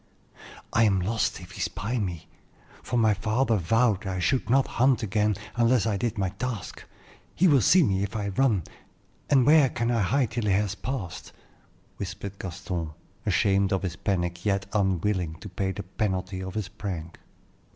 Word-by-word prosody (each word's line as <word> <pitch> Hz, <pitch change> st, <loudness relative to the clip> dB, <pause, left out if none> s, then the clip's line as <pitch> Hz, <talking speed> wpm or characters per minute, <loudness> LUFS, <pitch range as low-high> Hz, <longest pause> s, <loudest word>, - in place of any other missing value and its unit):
"I 115 Hz, -, +5 dB
am 100 Hz, -3 st, +3 dB
lost 110 Hz, +5 st, 0 dB
if 90 Hz, +1 st, -12 dB
he 100 Hz, -2 st, -7 dB
spy 115 Hz, +7 st, -2 dB
me, 90 Hz, -6 st, -4 dB, 0.5 s
for 125 Hz, -, -2 dB
my 110 Hz, -2 st, +4 dB
father 115 Hz, +4 st, +1 dB
vowed 105 Hz, +2 st, +2 dB
I 95 Hz, -1 st, -2 dB
should 115 Hz, +6 st, 0 dB
not 135 Hz, +2 st, +4 dB, 0.2 s
hunt 130 Hz, -2 st, +4 dB
again 105 Hz, 0 st, +1 dB, 0.2 s
unless 120 Hz, -1 st, +3 dB
I 110 Hz, -3 st, +1 dB
did 115 Hz, +3 st, -2 dB
my 95 Hz, -2 st, 0 dB
task. 110 Hz, +1 st, -5 dB, 0.5 s
He 185 Hz, -, +4 dB
will 140 Hz, -6 st, +5 dB
see 180 Hz, -, +6 dB
me 95 Hz, -7 st, +1 dB
if 100 Hz, +2 st, -3 dB
I 105 Hz, -2 st, -2 dB
run, 105 Hz, -3 st, +2 dB, 0.7 s
and 135 Hz, -4 st, +5 dB
where 150 Hz, -2 st, +6 dB
can 120 Hz, 0 st, -1 dB
I 115 Hz, -2 st, +2 dB
hide 125 Hz, +4 st, +1 dB
till 115 Hz, -2 st, -2 dB
he 100 Hz, -, +3 dB
has 100 Hz, 0 st, +1 dB
past?" 100 Hz, -4 st, -5 dB, 0.6 s
whispered 100 Hz, +1 st, -6 dB
Gaston, 90 Hz, -3 st, -4 dB, 0.3 s
ashamed 100 Hz, -1 st, +2 dB
of 95 Hz, 0 st, 0 dB
his 90 Hz, -3 st, -3 dB
panic, 85 Hz, -3 st, -2 dB
yet 100 Hz, -2 st, 0 dB
unwilling 95 Hz, -4 st, 0 dB
to 105 Hz, -, -10 dB
pay 95 Hz, +1 st, -2 dB
the 100 Hz, -, -6 dB
penalty 95 Hz, -1 st, -2 dB
of 95 Hz, -1 st, -6 dB
his 105 Hz, -3 st, -2 dB
prank. 85 Hz, -6 st, -6 dB
100 Hz, 175 wpm, -26 LUFS, 95-115 Hz, 0.7 s, see